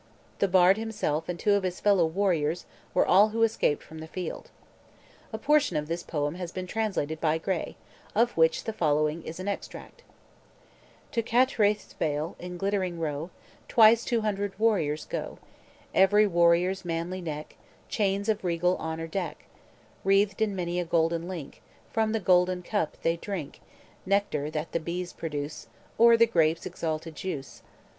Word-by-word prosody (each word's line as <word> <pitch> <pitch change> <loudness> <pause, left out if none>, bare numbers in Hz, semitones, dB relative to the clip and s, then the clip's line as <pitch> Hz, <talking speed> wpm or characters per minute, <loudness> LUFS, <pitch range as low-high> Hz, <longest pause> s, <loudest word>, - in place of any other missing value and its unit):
The 200 - +3
bard 185 +1 +5
himself 210 -9 -2
and 175 - -2
two 205 - +3
of 200 - +3
his 185 -1 -3
fellow 195 -5 +4
warriors 170 -2 0 0.3
were - - +3
all 200 +4 +6
who 225 +1 0
escaped 225 -9 +1
from 160 - -11
the 160 - -8
field. 180 +2 -6 0.8
A - - -3
portion 295 - +2
of 150 0 -2
this 170 +2 -3
poem 150 -3 -2
has 175 -1 -6
been 185 -1 -5
translated 185 -7 -2
by 160 -1 +2
Gray, 175 +1 -3 0.4
of 235 +3 +2
which 160 0 +3
the 220 - -4
following 155 -2 +1
is 160 +2 -8
an 185 - -5
extract: 205 - -6 1.1
"To 230 - +1
Cattraeth's 225 -4 +2
vale, 150 +1 -2
in 180 0 -7
glittering 190 -2 -1
row, 155 +1 -3 0.4
Twice 230 0 +6
two 235 -2 0
hundred 205 -2 -2
warriors 185 -9 +1
go; - - -5 0.6
Every 205 +3 +5
warrior's 175 0 +3
manly 175 +2 -3
neck 155 -3 -6 0.3
Chains 200 -1 0
of 215 -2 0
regal 180 +1 +1
honor 160 0 -4
deck, 170 0 -4 0.6
Wreathed 195 +1 +2
in 210 -3 +1
many 175 -1 -2
a - - 0
golden 165 0 0
link; 170 -7 -7 0.3
From 220 -1 +1
the 225 - 0
golden 180 -1 +3
cup 190 -5 -2
they 165 +1 +1
drink 170 -6 -6 0.5
Nectar 195 -7 0
that 155 +1 -4
the 170 - 0
bees 175 +2 -4
produce, 150 -2 -5 0.3
Or 235 0 +7
the 230 - +6
grape's 165 -7 +1
exalted 160 0 -4
juice. 150 -7 -6
180 Hz, 160 wpm, -27 LUFS, 160-205 Hz, 1.1 s, Or